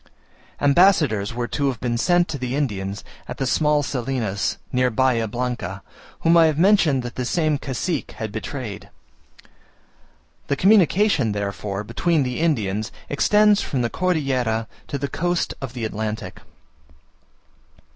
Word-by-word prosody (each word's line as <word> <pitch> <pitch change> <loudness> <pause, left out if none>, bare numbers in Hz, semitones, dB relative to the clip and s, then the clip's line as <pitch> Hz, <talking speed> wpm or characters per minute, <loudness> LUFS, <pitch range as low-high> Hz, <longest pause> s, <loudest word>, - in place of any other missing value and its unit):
Ambassadors 145 - +3
were 120 0 -3
to 140 +2 -1
have 130 -4 -2
been 120 0 -1
sent 175 +8 +2
to 140 - -5
the 125 +1 -3
Indians 100 -8 -2 0.2
at - - -6
the 135 - -1
small 150 +2 +2
Salinas, 120 -7 -2
near 125 0 +2
Bahia 120 -1 +1
Blanca, 120 -5 -4 0.4
whom 165 +1 +4
I 165 -1 +7
have 155 -2 0
mentioned 170 -8 +4
that 120 - -6
this 125 -1 -3
same 155 -4 +1
cacique 140 +4 -3
had 110 -2 -5
betrayed. 110 -1 -6 1.6
The 140 - +1
communication, 190 - +3
therefore, 100 0 -3
between 165 +7 0
the 125 +1 -3
Indians, 110 -10 0 0.2
extends 210 +7 +4
from 130 -3 -2
the 115 - -1
Cordillera 130 -11 0 0.2
to 140 - -3
the 140 +1 -3
coast 175 +3 -1
of 130 -3 -6
the 120 -3 -4
Atlantic. 110 0 -4
130 Hz, 140 wpm, -22 LUFS, 110-155 Hz, 1.6 s, I